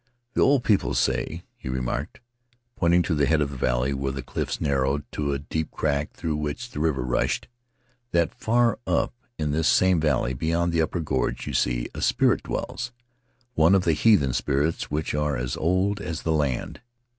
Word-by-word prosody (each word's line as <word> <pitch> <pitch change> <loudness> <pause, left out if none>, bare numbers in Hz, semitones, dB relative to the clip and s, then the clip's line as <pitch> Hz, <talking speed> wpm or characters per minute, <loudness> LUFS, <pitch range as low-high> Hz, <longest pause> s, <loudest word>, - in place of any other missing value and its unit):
"The - - +1
old 135 -3 +4
people 105 -5 +2
say," 85 +2 0
he - - -8
remarked, 65 - -3 0.5
pointing 85 0 +3
to 85 - -1
the 75 -3 +2
head 80 0 +3
of 70 -2 0
the - - -7
valley, 65 +1 0
where 70 0 -2
the 65 -1 -5
cliffs - - -3
narrowed 70 0 +1
to 75 -2 -1
a 70 - 0
deep 80 +3 -3
crack 75 -1 -1
through 80 -2 -2
which 75 +12 -4
the - - -5
river 75 -5 +1
rushed, 60 0 0 0.6
"that 85 -4 +1
far 120 0 +2
up - - +1 0.2
in 75 -2 -1
this 80 +2 +1
same 95 -2 +4
valley, 65 -5 +1
beyond 85 +5 0
the 85 - +3
upper 80 +2 -1
gorge 65 -5 -1
you - - -4
see, - - +1
a - - -6
spirit - - +3
dwells, 120 0 -4 0.6
one 80 +2 +5
of 95 - +3
the 85 - +3
heathen 75 - +4
spirits 70 +5 0
which 75 +1 -2
are 75 -2 0
as 60 0 -2
old 95 +5 +1
as 85 -5 -4
the 80 - +1
land. 70 -5 -1
75 Hz, 190 wpm, -25 LUFS, 70-85 Hz, 0.6 s, one